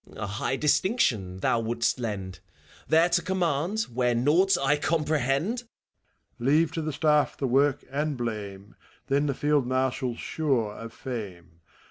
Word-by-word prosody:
A - - -4
high 100 +6 -2
distinction 145 - +1
thou 115 - +2
wouldst 115 +2 0
lend, 95 -6 -4 0.2
— 75 - -25
There 160 +3 +5
to 175 0 +2
conmiand, 180 +3 0
where 125 0 +1
naught 170 +10 +3
I 140 +2 +2
comprehend! 150 - 0
ACT 245 0 -4
IV, 240 - -25
IW - - -58 0.7
MEPHISTOPHHLES. 120 - -3
Leave 155 +2 +4
to 160 - -3
the 155 -1 -3
Staff 150 -2 +2
the 135 - -1
work 135 +2 +2
and 145 0 -1
blame, 105 -4 -5 0.3
Then 140 +2 +2
the 140 - -1
Field 145 -3 +1
Marshial's 130 -1 -1
sure 130 -9 -1
of 115 +1 -8
fame! 95 -11 -7
135 Hz, 165 wpm, -27 LUFS, 115-155 Hz, 0.7 s, There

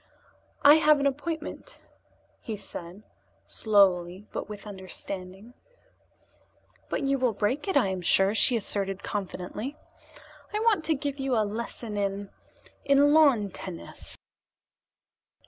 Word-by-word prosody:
"I 290 +2 +9
have 305 -1 +5
an 280 - 0
appointment," 315 - -3 0.6
he 220 -2 -5
said 190 0 -9 0.4
slowly, 190 -3 +2
but - - -5
with 210 0 -8
understanding. 190 +2 -8 1.4
"But - - -2
you 275 0 +1
will 250 -3 +2
break 240 - -1
it, 385 - +2
I 240 -8 +3
am 190 -1 -3
sure," 195 +3 +3
she 235 +2 +4
asserted 195 -2 -2
confidently. 205 +7 -5 0.8
"I - - +1
want 430 -8 +2
to 320 - +2
give 285 0 -4
you 270 -2 0
a 215 -2 +2
lesson 220 0 -5
in 200 0 -2 0.5
in 285 +1 +5
lawn 270 -11 +5
tennis." 180 -2 -8
215 Hz, 125 wpm, -27 LUFS, 195-280 Hz, 1.4 s, I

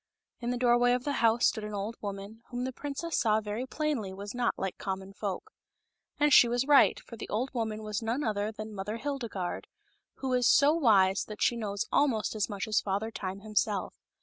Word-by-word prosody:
In 240 - -3
the 245 - -1
doorway 245 0 +4
of 250 0 -1
the 290 - -1
house 230 +1 +4
stood 220 - +1
an 210 0 -5
old 205 +3 -3
woman, 200 +2 -6
whom 245 0 -3
the 260 0 -3
princess 290 +5 -3
saw 215 -2 +3
very 215 +4 -4
plainly 285 -10 -2
was 200 +1 -7
not 245 -1 0
like 190 -1 -4
common 190 0 -5
folk. 205 - -5 0.7
And 295 -1 +4
she 245 - +8
was 245 +2 0
right, 285 -1 +5
for 230 - -11
the - - -7
old 245 +6 -2
woman 220 -3 -3
was 210 0 -3
none 230 +6 -1
other 210 -2 -1
than 215 0 -8
Mother 205 +2 -4
Hildegarde, 235 -9 -4 0.5
who 265 -1 -3
is 250 -1 +3
so 285 +2 +6
wise 200 - +4
that 210 -1 -4
she 240 - +3
knows 205 -3 -2
almost 255 -7 +2
as 215 0 -1
much 200 0 -4
as 215 - +2
Father 205 +3 -2
Time 195 -2 -5
himself. 210 -1 -1
220 Hz, 205 wpm, -30 LUFS, 205-250 Hz, 0.7 s, she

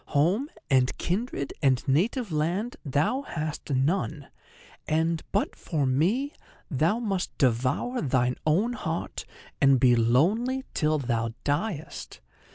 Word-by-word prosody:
Home, 195 - +2 0.2
and 130 -2 +2
kindred, 180 - -2
and 130 -1 +2
native 200 - +1
land 175 +10 -1
thou 150 - +1
hast 155 - -5
none; 145 +1 0 0.6
and, 160 +1 +1
but 200 - 0
for 150 -5 -1
me, 190 - +1 0.4
thou 160 - +2
must 200 -6 -2
devour 130 - +1
thine 125 -2 +1
own 195 +11 +2
heart 165 -8 -4 0.4
and 135 -1 +6
be 125 -1 +5
lonely 190 - +2
till 155 -1 +2
thou 115 -4 -1
diest. 155 +2 -3
155 Hz, 120 wpm, -27 LUFS, 135-205 Hz, 0.6 s, and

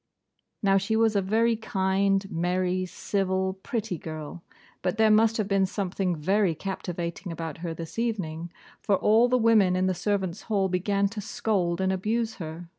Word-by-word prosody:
Now, 195 -1 +4
she 200 +3 -1
was 220 -1 +3
a 200 - +3
very 225 +4 +2
kind, 195 -2 +1
merry, 180 +2 0
civil, 190 0 -1
pretty 215 -7 -3
girl; 155 +1 -7 0.4
but 185 +3 -1
there 220 -1 +5
must 225 +1 +4
have 215 -3 -1
been 195 -2 +2
something 190 -2 -2
very 185 +3 +1
captivating 175 0 -5
about 165 -2 -5
her 165 -1 -4
this 165 +6 -7
evening, 175 -8 -2 0.3
for 200 - +2
all 225 +5 +4
the 255 - +3
women 220 -6 +4
in 185 0 +1
the 185 - +2
servants' 190 0 -2
hall 195 -3 +2
began 200 +2 +1
to 215 0 -6
scold 205 -6 -1
and 190 0 +1
abuse 220 +4 -1
her. 165 0 -7
195 Hz, 170 wpm, -27 LUFS, 180-215 Hz, 0.4 s, there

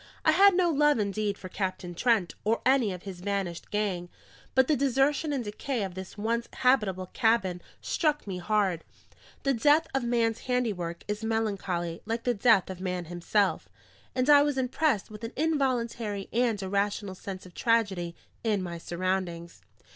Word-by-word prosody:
I 315 - +7
had 390 +4 +6
no 350 -2 +3
love 295 -1 +4
indeed 205 -1 -1
for 185 - -8
Captain 185 -2 -4
Trent 215 -1 +1
or 225 +2 0
any 255 -5 +4
of 180 -1 -7
his 190 -3 -7
vanished 190 -3 -3
gang; 195 -4 -1 0.5
but 260 -1 +5
the 305 - +3
desertion 275 +3 +1
and 270 -4 -1
decay 225 +3 -3
of 190 -2 -4
this 190 +3 -8
once 230 +3 -1
habitable 200 -8 +1
cabin 220 -7 +2 0.2
struck 300 -3 0
me 190 -3 -4
hard: 190 -3 +1 0.6
the 275 - +2
death 295 +7 +4
of 270 -2 0
man's 230 -2 +1
handiwork 205 -10 -2
is 210 +1 -3
melancholy 200 -6 -2
like 230 +1 -2
the 245 - +2
death 220 -3 +4
of 185 -1 -7
man 180 -2 -2
himself; 195 +3 0 0.5
and 255 +1 +1
I 290 -1 +8
was 290 -1 +1
impressed 260 -4 0
with 210 +1 -10
an 230 - -5
involuntary 240 -9 -1
and 235 -3 +2
irrational 200 +1 -1
sense 185 0 -8
of 180 - -13
tragedy 195 -8 +1 0.3
in 210 -4 +1
my 170 -2 -5
surroundings. 175 -1 -3
210 Hz, 165 wpm, -28 LUFS, 185-250 Hz, 0.6 s, I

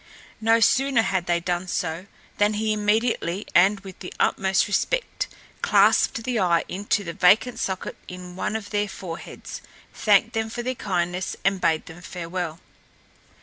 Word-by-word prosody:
No 225 +1 +4
sooner 265 0 +3
had 190 -4 -1
they 175 0 +2
done 175 +1 -2
so 170 +1 -3 0.3
than 210 +1 +3
he 215 0 0
immediately 210 -3 0
and 195 +3 +5
with 190 -2 -11
the 180 - -8
utmost 190 0 +2
respect - - -1 0.3
clapped 230 - +4
the 245 -1 -1
eye 175 -3 +3
into 205 +2 -1
the 170 -3 -5
vacant 210 +8 +4
socket 190 -1 -3
in 180 0 -9
one 200 - -2
of 215 -2 -5
their 205 -1 0
foreheads, 175 -2 -8 0.3
thanked 215 +2 +3
them 225 -1 -1
for 240 +2 -5
their 255 +1 -1
kindness 180 -5 -2
and 195 -1 +2
bade 160 -1 +1
them 170 +1 -11
farewell. 175 -2 -5
195 Hz, 155 wpm, -24 LUFS, 180-220 Hz, 0.3 s, and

